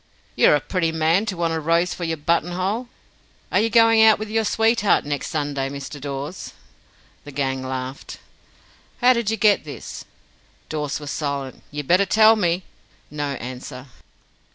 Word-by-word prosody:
"You're - - +5
a - - +2
pretty 165 -1 -1
man 160 +6 +1
to 190 -5 -3
want 165 -1 0
a 160 - -1
rose 165 +3 +1
for 175 - -5
your 165 -1 -2
buttonhole! 180 +9 -1 0.6
Are - - +3
you 225 +2 +2
going 225 0 +5
out 220 -1 +7
with 215 0 -6
your 225 0 +1
sweetheart 225 -3 +2
next 145 -1 -3
Sunday, 145 -3 -2
Mr. 140 +1 -7
Dawes?" 140 +5 -6 0.7
The 145 - -10
gang 135 -1 -2
laughed. 130 +1 -6 0.8
"How 250 +1 +6
did 235 -3 -1
you 225 - -1
get 205 -1 +3
this?" 150 -2 -8 0.7
Dawes 150 -2 -3
was 145 -2 -6
silent. 140 -3 -4
"You'd 145 -1 -6
better 185 +3 +4
tell 220 +3 +6
me." 180 -3 0 0.5
No 145 -1 -3
answer. 130 +1 -8
165 Hz, 160 wpm, -22 LUFS, 140-205 Hz, 0.8 s, out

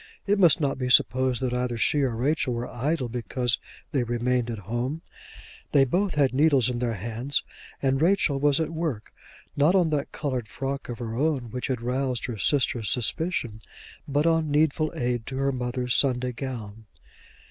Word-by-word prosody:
It 205 0 +2
must 175 -3 +6
not 140 -3 -1
be 125 -1 -1
supposed 130 0 +3
that 125 -1 0
either 125 -1 -1
she 145 +6 +2
or 130 -4 0
Rachel 130 0 0
were 120 +1 -3
idle 135 +2 -1
because 120 0 -1 0.3
they 135 - +1
remained 120 +1 0
at 115 - -3
home. 125 - -3 0.7
They 135 -2 +6
both 180 +7 0
had 140 -3 +3
their 130 - -4
needles 140 -5 +4
in 120 - -3
their 120 -2 -1
hands, 115 +7 -2 0.4
and 135 +1 +2
Rachel 165 -5 +2
was 145 +1 +3
at 160 -1 -1
work, 160 -10 -4 0.4
not 150 +6 +4
on 175 -4 +3
that 145 -1 -1
coloured 130 -6 -3
frock 135 +7 -4
of 120 - -4
her 115 -2 -5
own 135 -4 0
which 125 +1 -3
had 125 -3 -2
roused 125 +1 -1
her 120 -4 -5
sister's 120 -5 +1
suspicion, 125 -3 -1 0.5
but 145 +2 +1
on 165 -2 +2
needful 155 +1 +2
aid 120 -2 -2
to 130 - -4
her 135 0 +1
mother's 125 -1 -1
Sunday 125 -2 +2
gown. 115 -4 -7
130 Hz, 180 wpm, -26 LUFS, 120-145 Hz, 0.7 s, must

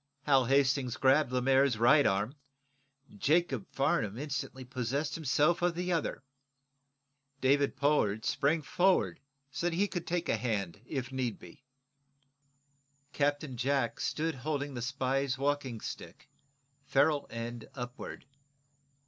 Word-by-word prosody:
Hal 135 -3 +4
Hastings 135 -1 +2
grabbed 135 0 +3
Lemaire's 130 0 +3
right 135 +6 +5
arm. 100 +6 0 0.9
Jacob 145 - +1
Farnum 115 -7 0
instantly 135 -2 -4
possessed 135 +4 -2
himself 155 +2 +2
of 175 -1 +1
the 180 +1 -2
other. 165 -4 -2 1.2
David 140 +1 +2
Pollard 110 -8 +1
sprang 150 +3 +1
forward 185 +5 +2 0.3
so 170 +5 -1
that 165 - -4
he 200 +4 +2
could 175 -4 -5
take 175 0 -1
a - - +1
hand, 105 -5 -2
if 130 -3 -4
need 130 -4 -2
be. 145 -4 -15 1.5
Captain 145 -1 0
Jack 130 -1 0
stood 160 +1 -1
holding 145 +1 -3
the 120 - -5
spy's 135 +1 -1
walking 140 -4 -1
stick, - - -8 0.6
ferule 145 +1 +2
end 115 0 -6
upward. 125 +2 -7
135 Hz, 125 wpm, -31 LUFS, 125-150 Hz, 1.5 s, right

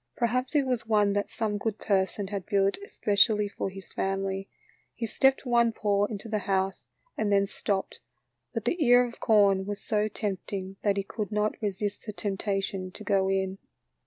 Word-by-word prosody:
Perhaps 250 +4 0
it 285 -2 +4
was 245 -3 -1
one 210 -2 +3
that 205 0 -1
some 210 -2 -2
good 215 0 -2
person 195 -1 0
had 200 -3 -4
built 200 - +2
especially 210 - +3
for 200 - -4
his 195 0 -11
family. 195 0 -2 0.5
He 235 - -3
stepped 265 +5 +2
one 235 -2 +3
paw 205 -2 +1
into 205 +1 -6
the 215 -1 -1
house 190 0 -1 0.3
and 210 -1 0
then 200 0 +4
stopped, 195 0 -3 0.5
but 225 -3 -4
the 330 +6 +1
ear 245 -1 +6
of 235 - -9
corn 200 -3 +4
was 205 0 -3
so 210 -1 0
tempting 195 -2 -4
that 200 -1 +1
he 200 - 0
could 205 +1 -5
not 210 0 +1
resist 205 +1 -3
the 210 - -4
temptation 195 -2 -2
to 215 - -8
go 195 -2 +2
in. 190 0 -1
205 Hz, 180 wpm, -28 LUFS, 195-220 Hz, 0.5 s, ear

